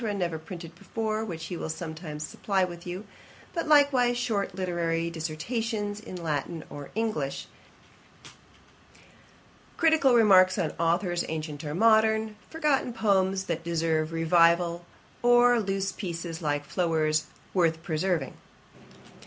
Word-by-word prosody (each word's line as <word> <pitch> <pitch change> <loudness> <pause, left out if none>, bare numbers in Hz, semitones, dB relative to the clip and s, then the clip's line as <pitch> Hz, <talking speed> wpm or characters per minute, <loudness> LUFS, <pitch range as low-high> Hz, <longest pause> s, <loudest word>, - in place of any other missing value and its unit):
never 170 -4 -2
printed 170 0 -9
before, 220 +4 -3
which 170 -7 -6
he 180 - -5
will 165 - -5
sometimes 160 -2 -5
supply 195 +4 -1
you 185 - +2
with; 175 +3 -7 0.5
but 335 -2 -2
likewise 275 -5 +4
short 210 -6 -1
literary 170 -2 -1
dissertations 205 +7 -3
in 210 - -9
Latin 160 -1 -3
or 145 -1 -8
English, 215 -12 -2 2.3
critical 315 -6 +4
remarks 185 -5 +6
on 160 - 0
authours 175 +1 +1
ancient 155 -2 -5
or 150 0 -4
modern, 220 +1 +3
forgotten 300 -6 0
poems 195 -4 +1
that 165 -3 -3
deserve 160 -2 0
revival, 170 +1 +3 0.4
or 245 0 +5
loose 195 -2 -1
pieces, 170 -3 -5
like 145 -2 -1
Floyer's, 155 -2 0 0.3
worth 165 -3 +1
preserving. 160 -3 -1
175 Hz, 120 wpm, -27 LUFS, 160-220 Hz, 2.3 s, remarks